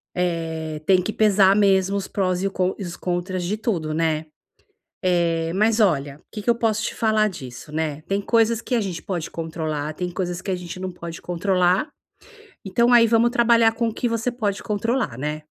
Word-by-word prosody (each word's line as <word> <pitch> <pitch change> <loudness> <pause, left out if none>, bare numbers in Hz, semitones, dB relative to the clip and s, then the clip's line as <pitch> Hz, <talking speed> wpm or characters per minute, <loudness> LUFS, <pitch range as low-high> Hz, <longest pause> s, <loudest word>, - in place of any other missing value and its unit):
Eh, 160 -3 -2
tem 185 0 +4
que 215 - -3
pesar 200 -3 +4
mesmo 195 -1 +3
os 195 -1 -3
prós 185 -2 -1
e 195 - +1
con 185 -1 0
e - - -5
os 175 -2 -6
contras 180 +1 -2
de 200 +5 -1
tudo, 180 -9 -2
né. 160 -1 0 0.8
É, 170 -2 +1
mas 215 +4 +2
olha 145 -9 +2
o - - -28
que 215 - -6
que - - -1
eu - - +6
posso 225 -2 0
te - - -2
falar 220 -1 +2
disso, 130 -5 -9
né. 155 -1 -2
Tem 195 +5 -2
coisas 230 +1 +2
que 250 - -2
a 230 - +2
gente 185 -4 -4
pode 175 -5 -4
controlar. 155 -2 -4
Tem 180 +3 -3
coisas 180 -1 -3
que 195 - -3
a - - +1
gente 180 0 -7
não 185 0 -4
pode 170 -1 -8
controlar. 180 - +1 0.8
Então, 235 +6 +2
aí 230 -1 +7
vamos 230 +1 +4
trabalhar 230 -2 +4
com 230 0 -1
o 220 - -7
que 245 - -1
você 230 +2 -1
pode 210 -5 -2
controlar, 220 - -1
né? 150 +3 -3
185 Hz, 205 wpm, -23 LUFS, 165-215 Hz, 0.8 s, aí